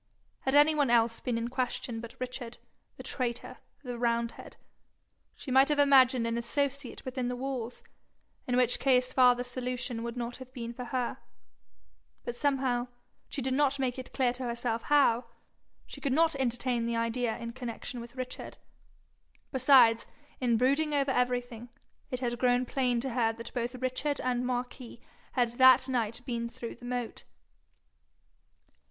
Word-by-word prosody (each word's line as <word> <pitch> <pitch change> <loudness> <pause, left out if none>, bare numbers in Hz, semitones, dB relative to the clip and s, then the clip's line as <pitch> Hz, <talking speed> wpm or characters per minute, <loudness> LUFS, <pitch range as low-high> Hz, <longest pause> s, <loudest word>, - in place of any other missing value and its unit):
Had 265 +1 0
any 295 +2 +7
one 290 -4 +2
else 230 -1 +3
been 245 -2 -2
in 230 +1 -2
question 250 -2 -2
but 235 0 -9
Richard, 250 -2 -5 0.4
the - - -9
traitor, 240 -3 -3 0.2
the 245 -2 -5
roundhead, 235 -1 -2 0.8
she 265 - -7
might 265 +2 +5
have 295 - +2
imagined 260 -4 +5
an 230 0 -1
associate 275 +2 -2
within 255 -1 -2
the 250 - -2
walls, 250 -2 -5 0.6
in 250 0 +1
which 245 -1 +3
case 255 -1 +2
farther 245 -1 +5
solution 250 -1 -3
would 235 +1 -5
not 240 0 -4
have 260 -1 -11
been 235 -2 -5
for 250 +1 -6
her; 245 0 -2 1.1
but 240 - -3
somehow, 260 -3 0 0.4
she 275 - -3
did 260 0 0
not 280 0 +2
make 260 -1 -1
it 255 - -8
clear 250 -3 +1
to 255 +1 -6
herself 235 -1 -2
how, 250 -5 +3 0.6
she - - -10
could 275 -3 0
not 325 +2 +3
entertain 245 -2 0
the 235 - -1
idea 230 0 -1
in 235 -1 -6
connection 245 0 -5
with 240 +1 -11
Richard. 255 -1 -6 0.9
Besides, 255 -4 +5 0.3
in 240 -3 +2
brooding 285 +5 +2
over 275 -1 +2
everything, 245 -2 -1 0.4
it 255 0 -4
had 240 -1 -2
grown 250 0 +3
plain 250 -2 0
to 265 +1 -2
her 230 -2 +1
that 230 +1 -9
both 245 0 -2
Richard 260 +3 -2
and 250 -1 0
Marquis 245 -1 -4 0.3
had 245 -2 +2
that 260 0 +7
night 235 -3 -1
been 235 -1 -3
through 235 0 -7
the 245 - -13
moat. 245 -1 -4
250 Hz, 160 wpm, -30 LUFS, 235-260 Hz, 1.1 s, any